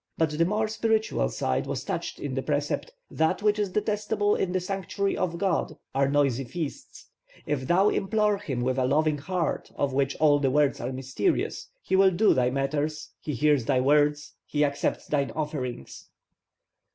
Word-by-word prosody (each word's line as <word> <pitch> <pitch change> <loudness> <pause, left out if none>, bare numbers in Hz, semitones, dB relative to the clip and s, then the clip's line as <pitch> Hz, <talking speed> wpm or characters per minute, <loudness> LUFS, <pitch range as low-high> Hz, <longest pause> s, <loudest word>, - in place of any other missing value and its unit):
But 160 -1 +1
the 160 +2 +2
more 210 +4 0
spiritual 220 0 0
side - - -1
was - - -3
touched - - -4
in - - -4
the - - -1
precept, - - -2 0.2
'That 160 +5 0
which 210 0 +3
is 205 -2 0
detestable 210 +1 0
in 180 - -1
the 185 - +1
sanctuary 195 +1 -2
of 170 -2 -2
god 185 -2 -1 0.2
are 135 0 +2
noisy 140 -3 +2
feasts; 160 - -6 0.4
if 140 -3 -2
thou 190 +4 +4
implore 210 +1 +1
him 135 -11 -3
with 130 +1 0
a 130 - +2
loving 150 +2 +2
heart, 175 +1 -2
of 140 -2 -1
which 140 0 +1
all 145 -2 +4
the 135 -2 +2
words 145 +1 +2
are 125 - -3
mysterious, 130 - -1 0.2
he - - 0
will 190 0 +6
do 190 +4 +3
thy 125 -1 +2
matters, 145 +3 -2
he 150 - -4
hears 145 -2 +2
thy 130 - +2
words, 145 +2 +2
he 150 0 +2
accepts 140 0 -1
thine 140 -2 0
offerings.' 140 - -5
150 Hz, 175 wpm, -27 LUFS, 140-195 Hz, 0.4 s, will